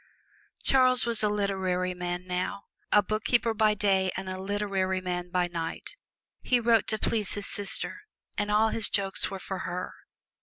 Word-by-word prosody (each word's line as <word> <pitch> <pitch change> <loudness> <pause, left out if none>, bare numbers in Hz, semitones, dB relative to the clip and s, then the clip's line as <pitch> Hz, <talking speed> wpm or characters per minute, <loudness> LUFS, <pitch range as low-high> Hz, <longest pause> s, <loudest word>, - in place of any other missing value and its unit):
Charles 255 -2 +4
was 235 -2 +3
a 210 - +3
literary 190 -3 0
man 180 0 -4
now: 185 +2 -3 0.3
a 210 - +6
bookkeeper 220 +3 +1
by 215 -1 +3
day 190 -2 +2
and 190 0 -5
a 185 0 -4
literary 195 -1 -1
man 180 -1 -3
by 180 0 +1
night. 170 - -5 0.5
He 250 - +2
wrote 230 -1 +3
to 215 - 0
please 215 -1 0
his 205 -1 -4
sister, 205 - -2 0.3
and 205 0 -1
all 215 +1 +4
his 220 -1 +1
jokes 195 -1 0
were 195 - -5
for 190 0 -5
her. 180 -1 -4
200 Hz, 165 wpm, -28 LUFS, 185-215 Hz, 0.5 s, a